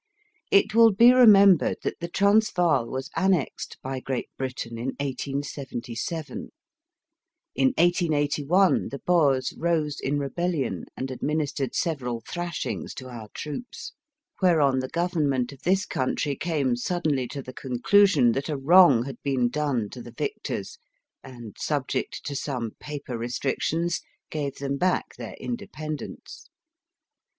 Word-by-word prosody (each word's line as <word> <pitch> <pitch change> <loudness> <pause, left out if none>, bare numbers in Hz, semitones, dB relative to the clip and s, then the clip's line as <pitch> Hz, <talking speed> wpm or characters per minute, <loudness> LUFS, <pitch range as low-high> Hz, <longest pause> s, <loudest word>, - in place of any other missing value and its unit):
It 200 +1 +4
will 230 0 +7
be 235 +5 +7
remembered 200 -8 +6
that - - -3
the 170 - -4
Transvaal 180 - +3
was 130 +5 -5
annexed 190 -6 0
by 130 0 -3
Great 130 -1 -4
Britain 125 -3 -5
in 130 +3 -3
1877, 140 - -4 1.0
In - - +3
1881 170 0 +2
the 140 - -5
Boers 145 -6 +2
rose 160 -4 0
in 145 +2 -1
rebellion 145 0 -2
and 130 0 -4
administered 145 -1 -2
several 125 -8 -2
thrashings 175 -1 -4
to 130 -2 -8
our 115 -3 -8
troops, 250 - -7 0.5
whereon 150 -8 +4
the 130 0 -4
Government 150 -8 0
of 140 - -14
this 190 +3 +1
country 140 +2 -1
came 140 -6 0
suddenly 145 -1 -1
to 140 +1 -6
the 130 - -9
conclusion 135 +2 +3
that 135 +6 -3
a 150 - -1
wrong 140 -4 +6
had 135 - -8
been 130 -3 +1
done 135 -6 -1
to 125 - -8
the 120 - -12
victors, 430 +2 -4 0.4
and, 120 -5 -10
subject 145 -4 -2
to 145 - -4
some 125 -5 -3
paper 140 -5 -6
restrictions, 140 +8 -1 0.3
gave 145 -3 -3
them 140 0 -3
back 180 +4 0
their - - -7
inde 240 -1 -4
pendence. 155 -1 -7
145 Hz, 130 wpm, -26 LUFS, 130-175 Hz, 1.0 s, will